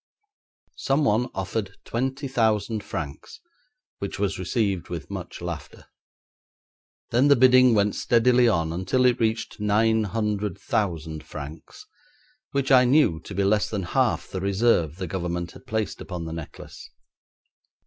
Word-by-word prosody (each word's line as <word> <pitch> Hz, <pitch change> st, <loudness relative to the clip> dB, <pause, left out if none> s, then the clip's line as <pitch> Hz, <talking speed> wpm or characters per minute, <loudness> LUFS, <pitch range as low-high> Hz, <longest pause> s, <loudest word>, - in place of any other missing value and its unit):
Someone 125 Hz, -4 st, +1 dB
offered 95 Hz, +1 st, -3 dB
twenty 135 Hz, +4 st, -2 dB
thousand 110 Hz, -4 st, 0 dB
francs, 75 Hz, -8 st, -7 dB, 0.6 s
which 100 Hz, -1 st, -4 dB
was 100 Hz, -2 st, -1 dB
received 95 Hz, -1 st, -1 dB
with 85 Hz, -5 st, -6 dB
much -, -, -7 dB
laughter; -, -, -7 dB, 1.3 s
then 125 Hz, +4 st, +4 dB
the 140 Hz, -, +6 dB
bidding 130 Hz, -1 st, +6 dB
went 105 Hz, 0 st, +2 dB
steadily 120 Hz, +1 st, +3 dB
on 80 Hz, -7 st, +1 dB
until 95 Hz, +9 st, +1 dB
it 125 Hz, -1 st, +3 dB
reached 110 Hz, 0 st, -1 dB
nine 110 Hz, +1 st, +2 dB
hundred 105 Hz, -2 st, -2 dB
thousand 80 Hz, -7 st, -2 dB
francs, 75 Hz, -, -10 dB, 0.6 s
which 140 Hz, 0 st, -1 dB
I 130 Hz, -1 st, +7 dB
knew 125 Hz, -, +3 dB
to 100 Hz, -, -10 dB
be 100 Hz, -, +1 dB
less 105 Hz, +2 st, +2 dB
than 105 Hz, -4 st, -3 dB
half 85 Hz, -, 0 dB
the 95 Hz, -, -5 dB
reserve 95 Hz, -5 st, +2 dB
the 95 Hz, +1 st, -5 dB
Government 85 Hz, -1 st, -3 dB
had -, -, -16 dB
placed 110 Hz, -1 st, -2 dB
upon 90 Hz, -3 st, -6 dB
the 80 Hz, -, -5 dB
necklace. 80 Hz, -2 st, -9 dB
105 Hz, 140 wpm, -25 LUFS, 90-120 Hz, 1.3 s, I